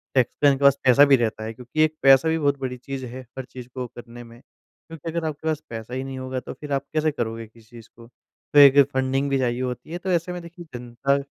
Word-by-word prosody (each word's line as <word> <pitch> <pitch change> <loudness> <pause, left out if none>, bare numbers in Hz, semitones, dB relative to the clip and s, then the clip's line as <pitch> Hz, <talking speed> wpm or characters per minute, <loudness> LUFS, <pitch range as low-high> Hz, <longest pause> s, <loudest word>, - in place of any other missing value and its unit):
Tax 125 -3 +3
का 145 - +8
इनके 140 0 0
पास 140 0 +6
पैसा 130 +2 +7
भी 140 -1 +6
रहता 115 -3 -1
है। 110 +1 -5
क्योंकि 125 +7 -1
एक 155 0 +1
पैसा 135 +3 +6
भी 160 - +1
बहुत 145 -2 +1
बड़ी 130 -1 -4
चीज़ 130 +1 -6
है, 125 +2 -8 0.2
हर 130 - -5
चीज़ 125 -1 -11
को 130 -1 -4
करने 120 0 -12
में। 115 0 -15
क्योंकि 165 +3 -12
अगर 170 0 -3
आपके 155 +1 -5
पास 155 -2 0
पैसा 115 +1 -7
ही 130 +1 -3
नहीं 135 0 -6
होगा 130 0 -4
तो 125 - -8
फ़िर 150 -1 -10
आप 135 - -1
कैसे 155 0 +1
करोगे 115 -4 -4
किसी 110 0 -21
चीज़ 115 -2 -13
को? 115 0 -15 0.5
तो 145 - +7
एक 140 0 +8
फंडिंग 130 +1 0
भी 135 - +1
चाहिए 125 -1 -1
होती 125 +4 -5
है, 175 - -3
तो 185 +2 -6
ऐसे 170 +1 0
में 180 - -6
देखिए 170 +1 -12
जनता 125 +3 -1
130 Hz, 260 wpm, -23 LUFS, 120-145 Hz, 0.5 s, का